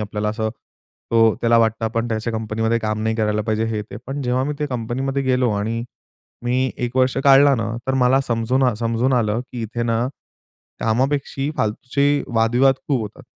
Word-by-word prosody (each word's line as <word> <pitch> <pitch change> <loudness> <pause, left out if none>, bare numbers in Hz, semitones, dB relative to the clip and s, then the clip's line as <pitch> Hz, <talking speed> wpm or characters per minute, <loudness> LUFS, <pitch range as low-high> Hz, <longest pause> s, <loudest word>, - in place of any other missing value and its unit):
आपल्याला 105 0 -2
असं 110 0 -2 0.6
तो 115 -1 +4
त्याला 115 0 +4
वाटतं, 115 0 +1
आपण 115 +1 -1
त्याच्या 115 +1 -2
कंपनीमध्ये 110 +1 -1
काम 110 -1 -2
नाही 110 0 0
करायला 105 -1 0
पाहिजे 110 +1 0
हे 110 -2 -2
ते. 105 - -10
पण 140 +2 -4
जेव्हा 125 +1 0
मी 150 - -2
ते 150 - -1
कंपनीमध्ये 130 +2 -2
गेलो. 125 -2 +2
आणि 110 +3 -2 0.6
मी 130 +2 +1
1 120 +2 -4
वर्ष 130 0 +2
काढला 140 0 +7
ना 115 -2 -2 0.2
तर 135 - 0
मला 130 +1 +3
समजून 125 +1 0
आ 125 -2 +3
समजून 115 +3 0
आलं, 115 -2 +1
की 125 -2 -7
इथे 120 +2 -3
ना, 115 +1 0 0.7
कामापेक्षा 135 +4 0
फालतूचे 140 +6 0
वादविवाद 120 +4 +4
खूप 135 -4 +1
होतात. 110 +6 -9
115 Hz, 180 wpm, -21 LUFS, 110-130 Hz, 0.7 s, काढला